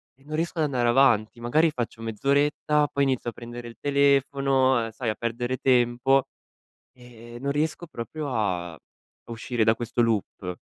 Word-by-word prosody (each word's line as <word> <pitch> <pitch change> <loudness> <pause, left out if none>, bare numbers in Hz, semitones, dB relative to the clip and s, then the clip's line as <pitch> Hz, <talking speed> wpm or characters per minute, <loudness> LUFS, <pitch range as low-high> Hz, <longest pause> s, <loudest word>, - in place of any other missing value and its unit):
e 135 - -26
non 155 +1 -6
riesco 165 +1 -2
ad 155 - +3
andare 125 -4 0
avanti. 120 -3 +3
Magari 155 +7 +2
faccio 120 -3 -5
mezz'oretta, 145 +5 +1
poi 140 - 0
inizio 130 -3 -1
a - - -26
prendere 120 0 -9
il 115 - -14
telefono, 135 -2 +2
uhm, 115 - -7
sai 115 +1 -3
a 110 - -1
perdere 120 +2 -3
tempo 130 +1 +2 0.7
e 120 -2 -14
e - - -8
non 140 +1 -2
riesco 155 +3 -2
proprio 140 +3 -6
a 90 -6 -1
a 115 - -19
uscire 115 0 -1
da 110 - +5
questo 120 0 -2
loop. 100 -5 -2
125 Hz, 175 wpm, -25 LUFS, 115-140 Hz, 0.7 s, da